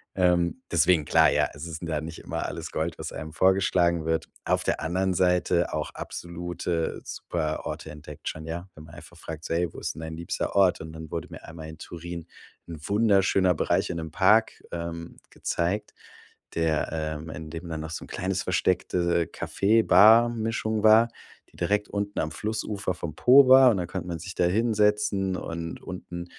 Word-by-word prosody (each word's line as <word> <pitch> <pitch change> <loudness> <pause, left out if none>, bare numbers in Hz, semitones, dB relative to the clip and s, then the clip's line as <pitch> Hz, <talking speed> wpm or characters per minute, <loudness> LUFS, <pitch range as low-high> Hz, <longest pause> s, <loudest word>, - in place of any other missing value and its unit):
Ähm, 90 +4 +2
deswegen 85 -1 +4
klar. - - +5
Ja, - - +2
es 75 +3 -8
ist 80 -1 -7
'n - - -5
da 80 -2 -2
nicht 80 +1 -7
immer - - -4
alles - - -5
Gold, 80 +1 -2
was - - -5
einem 80 0 -6
vorgeschlagen 90 -2 +2
wird. 80 0 0 0.2
Auf - - +1
der - - 0
anderen 95 +3 0
Seite 90 -1 +2
auch - - -2
absolute 85 -1 -4
super 80 -3 -3
Orte 80 - -5
entdeckt 75 -1 -10
schon, 80 0 -7
ja. 85 +3 -5
Wenn 75 - -12
man - - -14
einfach - - -13
fragt 80 0 -8
so: - - -2
„Hey, 85 +1 +1
wo - - -8
ist - - -4
denn 80 - -8
dein 80 0 -6
liebster 85 0 -3
Ort?" 95 -2 +4
Und 80 0 -8
dann 80 -1 -9
wurde 85 +1 -4
mir 80 - -10
einmal 80 -1 -9
in 80 - -10
Turin 85 0 -8 0.4
'n 85 -2 -8
wunderschöner 100 -3 +3
Bereich 80 - 0
in 85 - -4
'nem 80 -1 -5
Park, 105 +7 +3
ähm, 85 -1 -6
gezeigt, 100 +5 -2 0.6
der, 80 -2 +1
ähm 80 0 -4
in 80 -1 -8
dem 85 +1 -7
dann 80 -1 -4
noch 80 +1 -6
so 85 - -5
'n - - -12
kleines 95 +2 -2
versteckte 90 -2 +1
Kaffee-Bar-Mischung 110 +1 +3
war, 110 +2 +6 0.4
die - - -24
direkt 105 0 0
unten 100 0 -3
am 75 - -1
Flussufer 105 -2 -3
vom 85 -2 -6
Po 130 - +7
war. 130 0 +8
Und 110 - +2
dann 90 - -1
konnte 90 0 -5
man 85 -2 -3
sich 90 +3 -7
da 90 - +2
hinsetzen. 105 -1 +1
Und 85 -1 -6
unten 85 -1 -7
85 Hz, 190 wpm, -26 LUFS, 80-100 Hz, 0.6 s, war